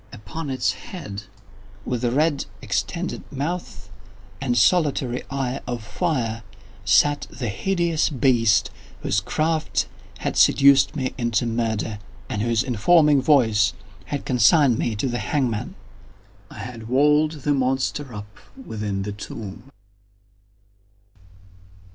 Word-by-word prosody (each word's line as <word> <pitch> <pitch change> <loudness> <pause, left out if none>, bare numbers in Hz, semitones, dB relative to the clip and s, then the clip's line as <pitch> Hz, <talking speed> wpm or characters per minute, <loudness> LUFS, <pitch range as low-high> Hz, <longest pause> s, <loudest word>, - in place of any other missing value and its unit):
Upon 145 +8 -7
its 130 -2 +1
head, 105 - -8 0.6
with 125 -1 -2
red 140 +4 +1
extended - - -3
mouth 145 - -5 0.5
and 125 -3 0
solitary 130 -2 +2
eye 135 -1 -2
of 120 -2 -4
fire, 115 - -2 0.4
sat 145 +8 +3
the 120 -4 -4
hideous 170 - 0
beast 120 -7 +3 0.3
whose 100 - +1
craft 155 +9 -1 0.3
had - - -3
seduced 140 +2 +5
me 130 -3 -2
into 120 0 +1
murder, 110 -2 -2 0.3
and 105 - -2
whose 115 +1 +1
informing 145 +5 +4
voice 110 -8 +3 0.3
had 145 -2 -4
consigned 130 -1 +4
me 115 - -1
to 105 - -1
the 120 -1 -2
hangman. 115 +1 -1 0.7
I - - -12
had 115 -2 -7
walled 150 +4 +3
the 145 - +2
monster 135 +1 -1
up 105 -2 -9 0.2
within 105 - -4
the 105 - -4
tomb! 105 +2 -8
125 Hz, 115 wpm, -23 LUFS, 110-145 Hz, 0.7 s, seduced